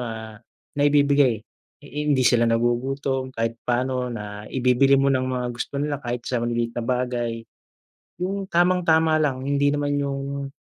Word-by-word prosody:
ah, 110 -2 -7 0.3
naibibigay. 140 -5 +3 0.4
Hindi 145 -2 0
sila 120 -1 +4
nagugutom 130 +3 0
kahit 115 -2 -3
paano, 125 +1 -1
na 105 -2 -7
ibibili 130 +2 +3
mo 135 0 +3
ng 130 - +2
mga 125 -1 -2
gusto 120 +3 -5
nila 145 0 -2
kahit 120 -1 -4
sa 125 -2 -1
maliliit 120 0 -1
na 120 - -3
bagay. 120 -1 -2 0.8
Yung 195 +2 -2
tamang-tama 170 -2 +3
lang 150 -4 +1
hindi 140 +1 +1
naman 145 0 0
yung, 140 0 -3
130 Hz, 140 wpm, -23 LUFS, 120-145 Hz, 0.8 s, sila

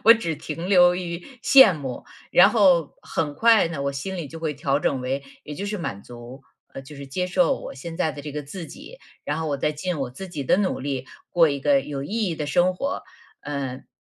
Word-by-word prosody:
我 230 +2 +10
只 170 -8 -2
停 160 +4 -6
留 180 -2 +6
于 170 -2 -4 0.3
羡 265 -10 +8
慕。 135 -5 -6 0.3
然 185 - +8
后 185 -8 +3
很 145 -2 -2
快 225 -2 +5
呢， 155 -4 -4
我 140 0 -1
心 185 +8 -5
里 170 -4 -4
就 165 +3 -9
会 155 -2 -2
调 140 0 0
整 135 -2 0
为， 135 +2 -2 0.2
也 150 - -7
就 200 +7 -5
是 210 +1 -3
满 100 - -5
足。 120 +2 -11 0.3
呃， - - -7
就 140 +2 -12
是 140 0 -8
接 180 +7 -2
受 270 +8 +2
我 - - -8
现 165 +5 -8
在 160 -3 +1
的 145 -1 -9
这 150 0 -7
个 150 +1 -4
自 165 +5 -8
己， 485 - -12 0.3
然 145 - -2
后 160 - -2
我 140 - -1
再 150 - +1
尽 165 +3 -3
我 130 -2 -3
自 185 +10 -8
己 155 -5 -5
的 135 - +3
努 195 -2 0
力 135 -1 -3 0.2
过 170 -2 +5
一 140 -1 -3
个 140 0 +3
有 140 -1 -5
意 140 - -7 0.2
义 170 - -2
的 150 -2 -4
生 175 +5 +2
活， 275 +9 -3 0.4
嗯。 135 -3 -5
150 Hz, 255 characters per minute, -24 LUFS, 140-180 Hz, 0.4 s, 我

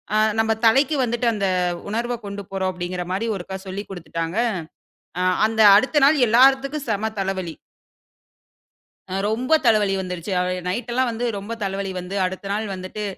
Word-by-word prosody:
அ - - +4 0.2
நம்ப 225 0 +3
தலைக்கு 270 +6 +4
வந்துட்டு 240 0 -1
அந்த 200 -2 -1 0.4
உணர்வ 235 +3 -2
கொண்டு 200 0 -5
போறோம். 190 -1 -1
அப்டீன்கற 180 0 -4
மாரி 210 +5 -1
ஒருக்கா 190 +1 -6
சொல்லிக் 200 +2 -6
குடுத்துட்டாங்க. 165 +1 -5 0.8
ஆ - - 0 0.3
அந்த 220 0 0
அடுத்த 265 +7 +3
நாள் 300 +2 +5
எல்லார்த்துக்கும் 270 +4 +3
செம 210 +1 -1
தலவலி. 190 -4 -2 1.6
அ - - -1
ரொம்ப 250 +7 0
தலைவலி 210 -4 +3
வந்துடுச்சி. 180 0 -5 0.4
நைட் 230 +6 -3
எல்லாம் 255 0 +1
வந்து 230 +2 -3
ரொம்ப 205 +4 -6
தலைவலி 195 0 -3
வந்து 180 +2 -6
அடுத்த 190 +2 -5
நாள் 215 +1 -2
வந்துட்டு, 185 +3 -6
205 Hz, 150 wpm, -22 LUFS, 190-235 Hz, 1.6 s, நாள்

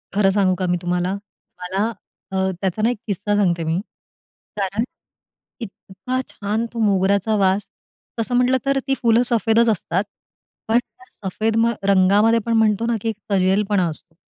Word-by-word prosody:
खरं 200 -2 +4
सांगू 190 -2 +2
का 185 - -2
मी 175 0 +1
तुम्हाला? 180 +1 -1 0.5
मला 195 +5 -1 0.4
अ, - - -4 0.3
त्याचा 195 +2 -1
ना 225 - +3
एक 245 - -2
किस्सा 205 +1 -1
सांगते 175 -5 +1
मी, 160 +3 0 0.8
कारण 200 +3 -1 0.8
इतका 225 +3 -5
छान 215 +3 -2
तो 230 - -5
मोगऱ्याचा 200 +1 +2
वास, 195 +1 +1 0.5
तसं 245 +2 -1
म्हटलं 250 +1 +3
तर 275 0 +2
ती 270 - +2
फुलं 230 0 +4
सफेदच 230 -1 +3
असतात 190 -2 0 0.6
पण 225 +2 +3
त्या 375 +8 -17
सफेद 215 +3 -2
म 230 +1 +3 0.2
रंगामध्ये 200 +4 +4
पण 230 - 0
म्हणतो 220 0 +2
ना, 235 -1 +1
की 225 - -1
एक 215 - -4
तजेलपणा 195 0 +2
असतो. 160 +1 -9
205 Hz, 160 wpm, -21 LUFS, 190-230 Hz, 0.8 s, खरं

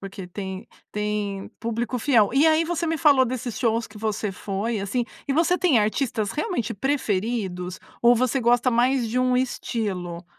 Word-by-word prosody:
porque 195 -1 -8
tem 190 +1 -6 0.3
tem 210 -2 -2
público 235 +2 -2
fiel. 225 -5 +3
E 285 +3 +5
aí 320 +1 +4
você 335 0 -2
me 325 - 0
falou 285 -5 +5
desses 245 -2 -4
shows 230 -1 +1
que 215 -1 -16
você 215 -2 -2
foi, 205 +4 -3
assim, 230 +5 -1 0.2
e - - +2
você 335 +4 +3
tem 310 -11 +4
artistas 215 -1 0
realmente 295 - -2
preferidos? 200 -7 -2 0.2
Ou 240 +1 +7
você 255 +2 +1
gosta 245 +2 +3
mais 245 0 +2
de 230 - -3
um 255 0 +2
estilo? 190 -9 -3
230 Hz, 170 wpm, -24 LUFS, 205-255 Hz, 0.3 s, Ou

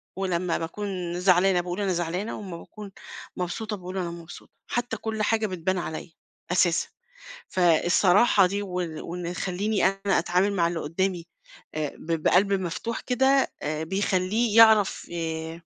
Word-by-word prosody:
ولمّا 180 -2 -1
باكون 180 0 -4
زعلانة 180 0 +4
باقول 175 +3 -4
أنا 195 -2 +1
زعلانة، 175 +5 -2
وأمّا 190 -5 -7
باكون 205 +3 -11 0.5
مبسوطة 210 +4 -3
باقول 185 0 -7
أنا 175 -2 -2
مبسوطة، 170 0 -11 0.2
حتى 240 -2 -2
كل 220 0 -3
حاجة 220 0 +1
بتبان 185 0 -2
عليَّ، 165 -1 -5 0.4
أساسًا، 175 -2 +2 0.6
فالصراحة 180 +4 +4
دي 200 +3 -1
وال 180 -5 -4
وإنه 175 0 -5
يخلّيني 195 +3 -1
أنا 195 0 +1
أتعامل 185 +3 +1
مع 170 -4 +2
اللي 170 -1 -3
قدّامي 175 +3 -2 0.5
آآ، 155 -2 -2
ب 165 -1 -3
بقلْب 195 +2 +4
مفتوح 190 +5 -3
كده، 265 +2 +2
آآ، 155 +1 -2
بيخلّيه 195 +5 0
يعرف 220 -3 +6
ي 165 0 -4
185 Hz, 140 wpm, -26 LUFS, 170-205 Hz, 0.6 s, يعرف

